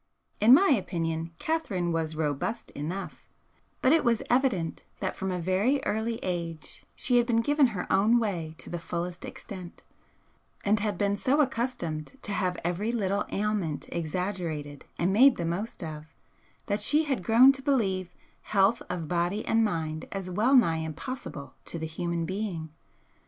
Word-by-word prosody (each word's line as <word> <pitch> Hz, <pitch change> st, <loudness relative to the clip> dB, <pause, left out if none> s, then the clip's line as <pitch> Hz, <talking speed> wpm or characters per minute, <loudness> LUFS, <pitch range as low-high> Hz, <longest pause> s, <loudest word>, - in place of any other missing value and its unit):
In 230 Hz, +5 st, +8 dB
my 390 Hz, +6 st, +4 dB
opinion 165 Hz, -, 0 dB
Catherine 205 Hz, -, -1 dB
was 160 Hz, -1 st, -1 dB
robust 155 Hz, +8 st, -2 dB
enough, 170 Hz, +7 st, -6 dB, 0.6 s
but 255 Hz, -, +5 dB
it 325 Hz, -, +4 dB
was 235 Hz, -2 st, +2 dB
evident 240 Hz, -11 st, +1 dB, 0.2 s
that 190 Hz, -, -2 dB
from 190 Hz, -, -3 dB
a 180 Hz, -, -1 dB
very 190 Hz, +10 st, +1 dB
early 225 Hz, +2 st, -1 dB
age 170 Hz, -3 st, -4 dB
she 250 Hz, -1 st, +2 dB
had 240 Hz, -1 st, +3 dB
been 230 Hz, -2 st, +3 dB
given 290 Hz, +2 st, +4 dB
her 200 Hz, -7 st, -4 dB
own 210 Hz, +5 st, +5 dB
way 175 Hz, -9 st, -2 dB
to -, -, -10 dB
the 175 Hz, -, -3 dB
fullest 170 Hz, +1 st, -4 dB
extent, 185 Hz, -4 st, -9 dB, 0.8 s
and 210 Hz, +1 st, +3 dB
had 210 Hz, 0 st, -1 dB
been 200 Hz, -1 st, +1 dB
so 265 Hz, +8 st, +1 dB
accustomed 235 Hz, -, -1 dB
to 205 Hz, -, -4 dB
have 185 Hz, -3 st, 0 dB
every 180 Hz, +6 st, -1 dB
little 200 Hz, -4 st, 0 dB
ailment 200 Hz, -7 st, -1 dB
exaggerated 165 Hz, -4 st, -3 dB
and 180 Hz, +3 st, +1 dB
made 260 Hz, +5 st, +7 dB
the 170 Hz, -, -3 dB
most 180 Hz, +4 st, -3 dB
of 155 Hz, -1 st, -7 dB, 0.6 s
that 205 Hz, -1 st, 0 dB
she 295 Hz, +9 st, +4 dB
had 275 Hz, -8 st, -1 dB
grown 235 Hz, +7 st, +7 dB
to 270 Hz, 0 st, -2 dB
believe 195 Hz, -10 st, 0 dB, 0.3 s
health 200 Hz, +3 st, +2 dB
of 175 Hz, -3 st, -3 dB
body 175 Hz, +5 st, 0 dB
and 225 Hz, 0 st, +3 dB
mind 160 Hz, -6 st, -2 dB
as 190 Hz, -2 st, -4 dB
well 230 Hz, +9 st, +3 dB
nigh 165 Hz, -11 st, +5 dB
impossible 160 Hz, -, -6 dB
to -, -, -6 dB
the 160 Hz, -, -3 dB
human 170 Hz, +1 st, -2 dB
being. 185 Hz, -4 st, -3 dB
190 Hz, 160 wpm, -28 LUFS, 170-230 Hz, 0.8 s, In